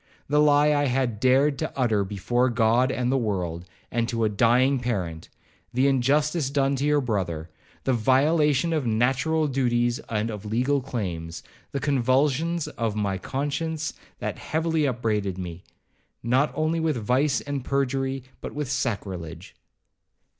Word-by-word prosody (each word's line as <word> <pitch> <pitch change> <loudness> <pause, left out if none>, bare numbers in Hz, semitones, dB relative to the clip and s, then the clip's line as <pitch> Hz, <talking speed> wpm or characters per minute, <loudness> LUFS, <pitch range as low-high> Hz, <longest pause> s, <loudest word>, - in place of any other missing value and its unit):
The 150 +1 +2
lie 150 0 +5
I 145 0 +2
had 125 -4 0
dared 135 +3 +3
to 155 - -2
utter 115 -6 +2
before 105 +6 0
God 120 +2 +3
and 125 -1 -1
the 135 - +2
world, 90 -6 -2 0.3
and 120 0 0
to 115 -1 -1
a 110 - +3
dying 125 +6 +3
parent,—the 110 +4 -3
injustice 140 +3 +2
done 140 -1 +1
to 140 - -1
your 150 0 +3
brother,—the 90 - -3
violation 145 +6 +3
of 150 -6 0
natural 135 +8 +1
duties 120 -3 +1
and 110 0 -1
of 105 -2 -7
legal 125 +6 0
claims,—the 90 0 -6
convulsions 140 +5 +1
of 115 -3 -3
my 100 -3 -1
conscience, 150 - -3 0.2
that - - -4
heavily 160 -1 0
upbraided 105 -7 -1
me, 90 -1 -7 0.6
not 130 +5 +2
only 155 +1 0
with 160 -4 0
vice 130 +5 +1
and 140 -2 -4
perjury, 135 -1 -1 0.2
but - - -7
with 145 -3 -3
sacrilege.' 100 - -4
130 Hz, 140 wpm, -25 LUFS, 110-145 Hz, 0.6 s, lie